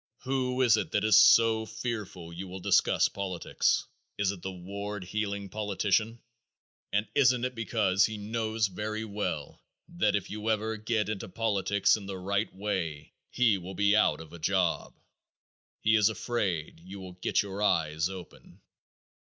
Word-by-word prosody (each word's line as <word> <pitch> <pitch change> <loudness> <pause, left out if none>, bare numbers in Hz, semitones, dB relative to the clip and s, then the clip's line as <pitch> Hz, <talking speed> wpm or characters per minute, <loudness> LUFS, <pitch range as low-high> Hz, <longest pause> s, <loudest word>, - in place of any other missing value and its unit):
Who 130 -1 0
is 115 -3 +5
it - - -2
that 105 - +2
is 110 -1 +5
so 110 0 +6
fearful 110 -7 -5
you 95 +3 -6
will 95 +1 -7
discuss - - +3
politics? 95 -3 -1 0.3
It 105 - 0
is 95 - +2
the 95 +2 -5
ward 100 +2 -6
heeling 100 +1 -3
politician, 105 +2 0 0.7
and 105 +1 0
isn't 125 -3 +4
it 125 - -3
because 110 -4 +2
he 110 -1 -6
knows 110 +1 -1
very 105 +3 -3
well 105 -1 -4 0.3
that 175 -7 +1
if 100 - -2
you 105 +1 -3
ever 110 0 0
get 110 0 -1
into 105 -3 -4
politics 100 -1 +2
in 100 -2 -9
the 95 -1 -5
right 100 +3 -1
way 95 -7 -4 0.2
he 115 -6 +2
will 90 +2 -8
be 100 +2 +3
out 105 - +3
of 80 0 -12
a 85 - -9
job? 90 +1 0 0.9
He 110 +1 +4
is 105 -1 +5
afraid 100 -10 -2
you 95 +4 -10
will 95 -1 -9
get 90 - 0
your 100 0 -6
eyes 80 -3 +1
open. 95 -2 -11
105 Hz, 160 wpm, -29 LUFS, 95-110 Hz, 0.9 s, so